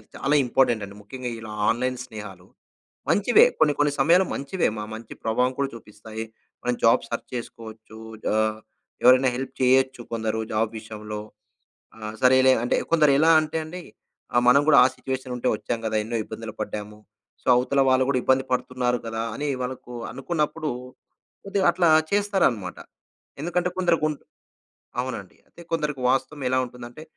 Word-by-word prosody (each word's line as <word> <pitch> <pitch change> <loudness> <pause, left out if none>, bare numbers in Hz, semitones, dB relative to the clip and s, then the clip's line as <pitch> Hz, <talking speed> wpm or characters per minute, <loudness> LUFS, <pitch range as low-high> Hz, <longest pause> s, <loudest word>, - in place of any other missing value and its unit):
చాలా 140 +2 +1
ఇంపార్టెంట్ 120 -3 +2
అండి. 100 0 -12
ముఖ్యంగా 125 +4 -6
ఇలా 110 -1 -8 0.2
ఆన్‌లైన్ 125 +2 0
స్నేహాలు 105 -6 -10 0.6
మంచివే. 245 - +5
కొన్ని 150 - +4
కొన్ని 145 0 +3
సమయాలు 170 +7 +5
మంచివే, 155 +7 -1
మా 105 - -4
మంచి 110 0 -9
ప్రభావం 125 +3 +1
కూడా 140 -1 0
చూపిస్తాయి. 110 0 -9 0.4
మనం 125 0 0
జాబ్ 115 - +4
సెర్చ్ 115 - -5
చేసుకోవచ్చు. 110 -2 -9 0.3
ఆహ్, 110 0 +1 0.4
ఎవరైనా 130 +1 +6
హెల్ప్ 130 +1 -5
చేయొచ్చు. 130 0 +3
కొందరు 110 -1 -1
జాబ్ 110 0 +1
విషయంలో 105 -1 -7 0.8
ఆ! - - -15 0.2
సరేలే 130 +1 +6
అంటే, 120 - +1 0.2
కొందరు 155 -3 +5
ఎలా 160 +2 +5
అంటే 155 +1 -3
అండి 175 +3 -8 0.5
ఆహ్, 120 - +5
మనం 135 +3 +7
కూడా 145 - +6
ఆ - - +6
సిట్యుయేషన్ 130 -1 -5
ఉంటే 125 - -2
వచ్చాము 115 +2 -4
కదా, 110 - -1
ఎన్నో 115 +2 -3
ఇబ్బందులు 110 0 -8
పడ్డాము. 105 0 -5 0.4
సో, - - -16
అవతల 135 +3 +2
వాళ్ళు 130 0 +4
కూడా 135 - +2
ఇబ్బంది 130 0 +3
పడుతున్నారు 125 -1 0
కదా! 115 0 -3
అని 150 - -3
వాళ్ళకు 125 -1 -6 0.2
అనుకున్నప్పుడు 155 -1 -2 0.8
కొద్దిగా 195 -1 0
అట్లా 175 -1 +2 0.2
చేస్తారన్నమాట. 190 - +1 0.6
ఎందుకంటే 175 +2 0
కొందరికుం 165 -4 +2 0.9
అవునండి, 125 -7 -6
అంటే - - -17
కొందరికి 150 -4 -1
వాస్తవం 135 +2 -1
ఎలా 130 +1 +2
ఉంటుందంటే 125 +3 -11
125 Hz, 150 wpm, -24 LUFS, 110-145 Hz, 0.9 s, మనం